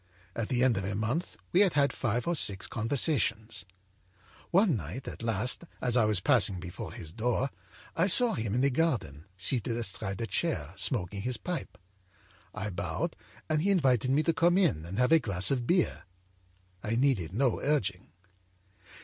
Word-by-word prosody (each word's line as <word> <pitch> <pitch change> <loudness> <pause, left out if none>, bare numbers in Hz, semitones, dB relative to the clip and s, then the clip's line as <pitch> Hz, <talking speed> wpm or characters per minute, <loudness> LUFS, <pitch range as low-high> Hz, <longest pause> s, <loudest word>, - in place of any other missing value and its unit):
At 115 -2 -3
the 125 -1 +1
end 125 -5 +3
of 95 - -2
a 100 +1 -3
month 120 - -2
we 180 - +3
had 200 -4 +4
had 140 -1 +2
five 120 -1 -1
or 175 - +1
six 100 -10 +2
conversations. 115 - 0 0.9
âOne 185 -3 +4
night, 95 - -6
at - - -7
last, 115 - +1
as 125 -2 -1
I 120 -3 +4
was 105 -3 +2
passing 105 -4 +2
before 90 -1 -7
his 80 -1 -9
door, 125 +5 -1 0.4
I 165 +3 +2
saw 240 +5 +6
him 110 -2 -2
in 125 - +1
the 140 +1 +3
garden, 120 - -1
seated 115 +4 0
astride 95 -3 -2
a 115 - -1
chair, 105 - -2
smoking 100 -1 -2
his 125 +3 0
pipe. 180 -2 -5 0.7
I 105 +1 -5
bowed 100 - -3 0.3
and 155 -1 +1
he 195 - +1
invited 130 - +2
me 145 +4 +3
to 165 - +1
come 175 +2 +3
in 135 - +1
and 90 +4 -6
have 125 +4 +2
a 165 - +7
glass 95 - 0
of 125 -3 -1
beer. 180 -1 +1 0.8
I 110 +5 -2
needed 120 - +1
no 125 -1 +1
urging. 105 - -1
120 Hz, 175 wpm, -29 LUFS, 100-150 Hz, 0.9 s, a